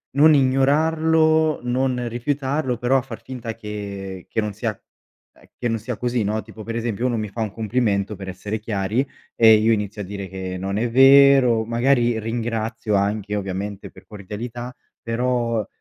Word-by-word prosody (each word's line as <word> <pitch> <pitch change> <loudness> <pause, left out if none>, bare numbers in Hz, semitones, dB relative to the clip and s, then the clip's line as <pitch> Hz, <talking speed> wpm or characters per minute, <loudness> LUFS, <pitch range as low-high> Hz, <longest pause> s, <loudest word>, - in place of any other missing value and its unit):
non 155 +3 +7
ignorarlo, 155 +3 +3
non 125 0 0
rifiutarlo 130 +2 -2
però 125 +3 +1
a - - +1
far 120 -3 -9
finta 115 -2 -6
che 100 -3 -7
che - - -2
non 105 -1 -3
sia 110 +2 -2 0.6
ehm, - - -23
che 120 - -1
non 115 - 0
sia 115 +1 -5
così, 120 -2 -1
no. 105 +2 -1
Tipo 110 0 -11
per 115 +1 -5
esempio, 115 0 -2
uno 120 -2 +1
mi 110 - -2
fa 110 +3 -6
un 110 -2 -2
complimento, 105 -2 -1
per 95 -1 -8
essere 100 +4 -5
chiari, 105 +4 -1 0.3
e 110 -1 +7
io 110 +2 +3
inizio 105 -1 -3
a - - -8
dire 100 0 -6
che 95 0 -5
non 95 +2 -3
è 120 +2 0
vero, 135 -2 +6
magari 120 0 +2
ringrazio 115 -1 -2
anche 105 +1 0
ovviamente 100 0 -4
per - - -16
cordialità, 115 +5 -7 0.3
però 115 -1 -1
115 Hz, 170 wpm, -22 LUFS, 105-125 Hz, 0.6 s, non